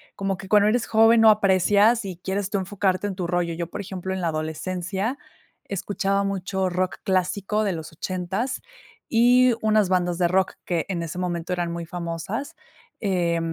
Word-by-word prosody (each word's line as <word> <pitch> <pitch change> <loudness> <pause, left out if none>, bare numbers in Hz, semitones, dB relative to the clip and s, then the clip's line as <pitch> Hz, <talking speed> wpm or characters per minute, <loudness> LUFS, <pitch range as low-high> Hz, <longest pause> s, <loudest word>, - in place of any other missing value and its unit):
como 195 -1 -2
que 190 - -10
cuando 210 +1 +5
eres 235 +1 +1
joven 225 +1 +5
no 225 - +8
aprecias 205 +2 +4
y 185 -3 -6
quieres 190 +2 -3
tú 200 -1 0
enfocarte 190 0 -1
en 195 - -4
tu 185 - -3
rollo. 175 -1 0
Yo, 170 0 -3
por 200 - -6
ejemplo, 190 -1 -5
en 190 - -3
la 170 - 0
adolescencia 180 - -3 0.5
escuchaba 200 0 -1
mucho 190 -1 -1
rock 185 +1 -1
clásico 195 +3 0
de 200 -3 0
los 160 -2 -7
80 185 - -3 0.5
y 245 +1 +5
unas 215 -3 +3
bandas 180 -2 +1
de 175 - +3
rock 190 +2 +1
que 170 -3 -1
en 180 -4 -2
ese 165 +2 -6
momento 175 -1 -3
eran 175 -1 -1
muy 170 0 -5
famosas. 175 - -5 0.5
Eh, 175 -4 +1
190 Hz, 175 wpm, -24 LUFS, 175-205 Hz, 0.5 s, no